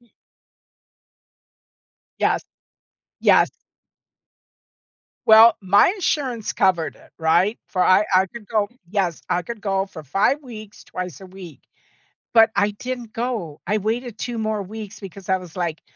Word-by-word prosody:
Y 240 Hz, -, -28 dB, 2.1 s
Yes. -, -, +1 dB, 0.8 s
Yes. -, -, +5 dB, 1.8 s
Well, 220 Hz, +1 st, +8 dB
my 195 Hz, +1 st, +5 dB
insurance 285 Hz, -, -1 dB
covered 180 Hz, -5 st, +1 dB
it, -, -, -20 dB
right? 170 Hz, +7 st, +2 dB
For 185 Hz, -, 0 dB
I 185 Hz, +3 st, +5 dB
I 185 Hz, +1 st, +5 dB
could 215 Hz, +2 st, -11 dB
go 210 Hz, -1 st, 0 dB, 0.2 s
Yes. 185 Hz, -4 st, -1 dB
I 175 Hz, 0 st, 0 dB
could 225 Hz, +3 st, -7 dB
go 195 Hz, -2 st, 0 dB
for 155 Hz, -5 st, -11 dB
5 195 Hz, -, +1 dB
weeks, 215 Hz, -5 st, -11 dB
twice 180 Hz, -6 st, -6 dB
a 190 Hz, -, -10 dB
week, 185 Hz, -4 st, -12 dB, 0.7 s
but 225 Hz, -1 st, +7 dB
I 205 Hz, +1 st, +2 dB
didn't 240 Hz, +1 st, -6 dB
go. 225 Hz, -11 st, -4 dB
I 210 Hz, -, +1 dB
waited 225 Hz, +2 st, -3 dB
2 240 Hz, -2 st, -4 dB
more 215 Hz, -1 st, -1 dB
weeks 215 Hz, +1 st, -9 dB
because 195 Hz, -1 st, -10 dB
I 190 Hz, -, +3 dB
was 180 Hz, -1 st, -12 dB
like, 170 Hz, -3 st, -2 dB
205 Hz, 140 wpm, -22 LUFS, 185-225 Hz, 2.1 s, Well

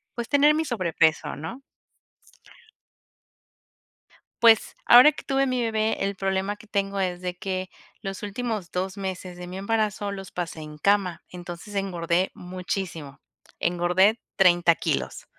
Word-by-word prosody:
pues, 235 Hz, -1 st, -4 dB
tener 290 Hz, +1 st, +5 dB
mi 320 Hz, +1 st, 0 dB
sobrepeso, 165 Hz, -, +1 dB
¿no? 160 Hz, -, -7 dB, 2.8 s
Pues, 225 Hz, -2 st, +5 dB
ahora 250 Hz, +5 st, +9 dB
que -, -, -11 dB
tuve 270 Hz, 0 st, +1 dB
mi 255 Hz, -1 st, 0 dB
bebé, 220 Hz, -1 st, 0 dB
el 200 Hz, 0 st, -2 dB
problema 195 Hz, +1 st, -1 dB
que 210 Hz, -, -16 dB
tengo 200 Hz, -2 st, -1 dB
es 180 Hz, -2 st, -1 dB
de 180 Hz, 0 st, -5 dB
que, 185 Hz, 0 st, -3 dB, 0.3 s
los 195 Hz, -1 st, -6 dB
últimos 210 Hz, -3 st, -4 dB
2 185 Hz, +1 st, -2 dB
meses 185 Hz, -2 st, -5 dB
de 180 Hz, -, -7 dB
mi 180 Hz, +1 st, -7 dB
embarazo 210 Hz, 0 st, -1 dB
los 195 Hz, -2 st, -8 dB
pasé 175 Hz, -2 st, -5 dB
en 150 Hz, 0 st, -9 dB
cama, 195 Hz, 0 st, +1 dB
entonces, 175 Hz, +3 st, -9 dB
engordé 180 Hz, -2 st, 0 dB
muchísimo. 180 Hz, -5 st, -5 dB, 0.4 s
Engordé 180 Hz, +5 st, +3 dB, 0.2 s
30 175 Hz, -3 st, +5 dB
kilos. 65 Hz, -, -3 dB
190 Hz, 135 wpm, -25 LUFS, 175-210 Hz, 2.8 s, ahora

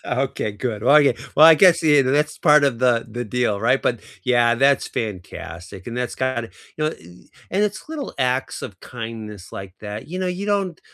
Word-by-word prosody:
Okay, 125 Hz, -4 st, -2 dB
good. 105 Hz, 0 st, -4 dB
Well, 135 Hz, +5 st, +5 dB
I 150 Hz, -, +7 dB
gue 140 Hz, -, +3 dB, 0.2 s
well, 155 Hz, -, +9 dB
I 165 Hz, -, +9 dB
guess, 180 Hz, +2 st, +5 dB
yeah, 150 Hz, -3 st, +5 dB
tha 130 Hz, -, 0 dB
that's 150 Hz, +2 st, 0 dB
part 150 Hz, -2 st, +5 dB
of 130 Hz, -5 st, 0 dB
the 120 Hz, -2 st, +2 dB
the 120 Hz, +2 st, -5 dB
deal, 115 Hz, -2 st, -1 dB
right? 125 Hz, +5 st, +2 dB
But, 120 Hz, -3 st, 0 dB, 0.2 s
yeah, 120 Hz, -1 st, +3 dB
that's 135 Hz, +3 st, +2 dB
fantastic 95 Hz, -3 st, -7 dB
and 120 Hz, -, -6 dB
that's 125 Hz, 0 st, -3 dB
kinda 130 Hz, -3 st, -2 dB, 0.3 s
you 155 Hz, -, -2 dB
know, 155 Hz, -, +1 dB
i -, -, -10 dB, 0.6 s
and 195 Hz, +3 st, +1 dB
it's 210 Hz, +5 st, -4 dB
little 310 Hz, -3 st, -6 dB
acts 130 Hz, 0 st, -1 dB
of 100 Hz, -, -8 dB
kindness 110 Hz, -5 st, -8 dB
like 95 Hz, -2 st, -8 dB
that. 105 Hz, +3 st, -7 dB
You 180 Hz, +3 st, -5 dB
know, 185 Hz, -, -1 dB
you 185 Hz, +3 st, -5 dB
don't 195 Hz, -5 st, -1 dB
125 Hz, 215 wpm, -21 LUFS, 115-150 Hz, 0.6 s, well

